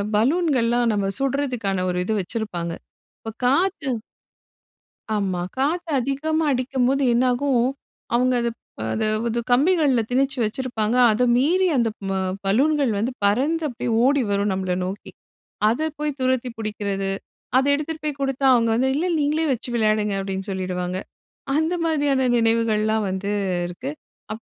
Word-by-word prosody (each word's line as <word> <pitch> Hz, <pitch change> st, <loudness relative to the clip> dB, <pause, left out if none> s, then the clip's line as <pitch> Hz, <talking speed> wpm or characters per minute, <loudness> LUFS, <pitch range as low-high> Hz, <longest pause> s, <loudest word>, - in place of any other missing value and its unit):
பலூன்கள்லாம் 245 Hz, -3 st, +2 dB
நம்ம 200 Hz, -2 st, 0 dB
சுடுறதுக்கான 250 Hz, -9 st, -1 dB
ஒரு 180 Hz, -, -1 dB
இது 220 Hz, -, 0 dB
வச்சிருப்பாங்க. 180 Hz, -4 st, -4 dB, 0.5 s
இப்போ 225 Hz, -, -6 dB
காத்து 320 Hz, +2 st, +1 dB, 1.3 s
ஆமா. 190 Hz, -3 st, -1 dB, 0.2 s
காத்து 330 Hz, +5 st, 0 dB
அதிகமா 310 Hz, +5 st, -1 dB
அடிக்கும்போது 260 Hz, +1 st, +1 dB
என்னாகும், 250 Hz, +1 st, +2 dB, 0.5 s
அவுங்க 250 Hz, +1 st, +3 dB
அத 235 Hz, -, +1 dB, 0.3 s
ப, -, -, -9 dB
அதப் 215 Hz, 0 st, 0 dB
அது 230 Hz, +1 st, -1 dB
கம்பிகள்ல 285 Hz, -2 st, +3 dB
திணிச்சு 270 Hz, +2 st, +1 dB
வச்சிருப்பாங்க. 225 Hz, 0 st, -1 dB, 0.2 s
அத 220 Hz, +4 st, 0 dB
மீறி 355 Hz, +9 st, +3 dB
அந்த 235 Hz, -2 st, +2 dB, 0.2 s
ம -, -, -1 dB, 0.3 s
பலூன்கள் 270 Hz, +5 st, +2 dB
வந்து 230 Hz, +6 st, -1 dB
பறந்து 275 Hz, +11 st, +2 dB
அப்படியே 240 Hz, -1 st, -4 dB
ஓடி 280 Hz, +1 st, +3 dB
வரும் 200 Hz, 0 st, +1 dB
நம்மள 185 Hz, -1 st, -1 dB
நோக்கி. 195 Hz, +2 st, -6 dB, 0.6 s
அத 275 Hz, +8 st, 0 dB
போய் 300 Hz, -1 st, -2 dB
துரத்தி 255 Hz, -1 st, +1 dB
புடிக்கிறது, 200 Hz, -3 st, -3 dB, 0.5 s
அத 265 Hz, -, +3 dB
எடுத்துட்டு 305 Hz, +2 st, -3 dB
போய் 285 Hz, -2 st, -3 dB
குடுத்தா 270 Hz, 0 st, -1 dB
அவுங்க 230 Hz, -2 st, +3 dB
வந்து, 260 Hz, +3 st, +2 dB
"இல்ல 335 Hz, +5 st, 0 dB
நீங்களே 305 Hz, +2 st, +1 dB
வச்சு 245 Hz, 0 st, -6 dB
விளையாடுங்க" 215 Hz, -2 st, +1 dB
அப்டின்னு 195 Hz, +1 st, -4 dB
சொல்லிடுவாங்க. 185 Hz, -1 st, -3 dB, 0.6 s
அந்த 320 Hz, +3 st, +1 dB
மாதிரியான 285 Hz, -5 st, +1 dB
நினைவுகள்லாம் 220 Hz, -2 st, +2 dB
வந்து 190 Hz, +2 st, -3 dB, 0.4 s
இருக்கு. 180 Hz, +10 st, -6 dB, 0.4 s
அப் 220 Hz, -, -6 dB
245 Hz, 135 wpm, -23 LUFS, 210-280 Hz, 1.3 s, அவுங்க